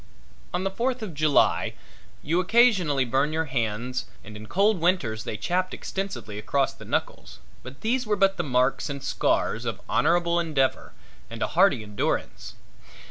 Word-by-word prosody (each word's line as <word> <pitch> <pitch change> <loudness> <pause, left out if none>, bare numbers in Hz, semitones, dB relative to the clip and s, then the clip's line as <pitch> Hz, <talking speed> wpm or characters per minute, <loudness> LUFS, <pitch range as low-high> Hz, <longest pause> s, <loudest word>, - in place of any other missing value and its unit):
On 180 0 -2
the 195 - -1
Fourth 245 +3 -2
of 195 -6 -6
July 150 -1 +2 0.5
you 165 +4 +1
occasionally 185 - +3
burned 135 +5 +1
your 160 +1 0
hands 125 -1 -2 0.2
and 105 -1 -11
in 105 0 -9
cold 200 - +2
winters 135 -12 0
they 110 - -4
chapped 180 - -1
extensively 190 - -5
across 135 +5 0
the - - -13
knuckles - - -3 0.2
but 130 +2 -11
these 245 +2 0
were 210 - +2
but 195 -1 +3
the - - -2
marks 125 -1 +1
and 140 -1 -5
scars - - 0
of - - -3
honorable 170 +1 +2
endeavor 150 -6 0 0.4
and - - -4
a - - -1
hardy 110 - +3
endurance. 105 -1 -3
155 Hz, 160 wpm, -25 LUFS, 130-190 Hz, 0.5 s, occasionally